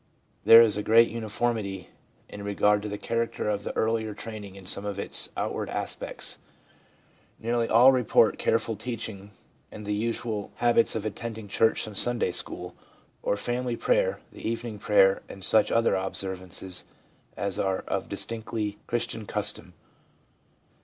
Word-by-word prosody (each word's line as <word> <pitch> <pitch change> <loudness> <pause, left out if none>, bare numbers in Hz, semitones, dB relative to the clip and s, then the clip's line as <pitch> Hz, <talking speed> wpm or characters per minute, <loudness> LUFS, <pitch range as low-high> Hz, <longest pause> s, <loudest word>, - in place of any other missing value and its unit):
There 115 +1 +10
is 105 -2 +1
great 115 +2 +5
uniformity 110 -4 -2 0.4
in 100 - -9
regard 100 0 +2
to 105 - -5
the 105 - -4
character 115 0 -2
of 105 -1 -1
the - - -5
earlier 110 -1 0
training 105 -3 -8
in 95 -1 -12
some 100 +2 0
of 100 -1 -4
its - - -2
outward - - -2
aspects; - - -4 1.0
nearly 115 0 0
all 120 +4 +7
report 125 -4 +3
careful 115 0 +1
teaching 110 -3 -6 0.4
and 105 - -9
the 105 - -1
usual 110 -1 -2
habits 120 -1 +3
of 110 - -3
attending 110 0 -5
church 110 +3 +2
and 110 -2 -9
Sunday 120 -3 +4
school, - - -3 0.5
or 100 - 0
family 120 +2 -2
prayer, - - +1
the - - -12
evening 115 -1 -4
prayer, 95 -2 +4
and 95 - -9
such 110 -1 +3
other 115 0 +3
observances 95 -1 -2 0.5
as 100 -2 -2
are 95 -1 0
of 95 - -3
distinctly 105 +1 -3
Christian 115 -2 -2
custom. - - -3
110 Hz, 145 wpm, -27 LUFS, 100-115 Hz, 1.0 s, There